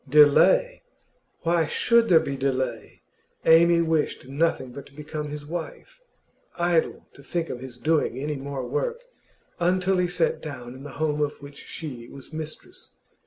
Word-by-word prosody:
Delay? 320 - +5 0.6
Why 165 -1 +2
should 235 +6 +3
there 170 -3 +7
be 140 - -3
delay? 130 -4 -2 0.4
Amy 170 +1 +6
wished 160 -5 -1
nothing 140 -2 0
but 140 +2 -9
to 140 - -20
become 150 0 -5
his 145 0 -6
wife. 175 - -7 0.6
Idle 175 -1 +1
to - - -15
think 165 +4 -3
of 125 - -5
his 130 -1 -9
doing 155 -3 +1
any 150 +3 -2
more 135 -1 -5
work 480 - -2 0.6
until 185 +2 +2
he 180 - +2
sat 175 -2 0
down 125 -5 -7
in 130 - -11
the 140 -1 -9
home 150 -1 0
of 145 0 -2
which 140 0 -11
she 125 -7 -7
was 140 +3 -13
mistress. 160 - -8
150 Hz, 160 wpm, -25 LUFS, 140-170 Hz, 0.6 s, there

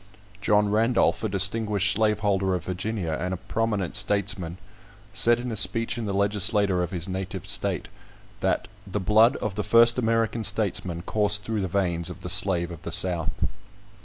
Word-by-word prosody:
John 105 0 +2
Randolph, 115 +3 +2
a 110 - -1
distinguished 100 +1 0
slaveholder 100 -3 +1
of 90 -2 -5
Virginia, 95 -1 -3
and 90 +1 -2
a - - -7
prominent 105 -2 -2
statesman, 95 -4 -1 0.6
said 120 0 +5
in 125 0 -5
a - - -3
speech 115 +2 +1
in 115 -2 -4
the - - -2
legislature 100 -1 +3
of 90 - -2
his 90 -2 -4
native 95 0 -5
state, - - -1 0.5
that - - -1 0.2
"the 100 +2 -3
blood 110 +6 +4
of 110 - -4
the 105 +2 -3
first 115 +3 +5
American 115 -1 0
statesmen 95 -5 -1
coursed 105 +1 +1
through 110 -1 -2
the 95 - -2
veins 85 -3 -1
of - - -10
the - - -5
slave 85 -3 +2
of 85 -2 -9
the - - -7
South." 90 -3 +2
100 Hz, 170 wpm, -25 LUFS, 95-110 Hz, 0.6 s, said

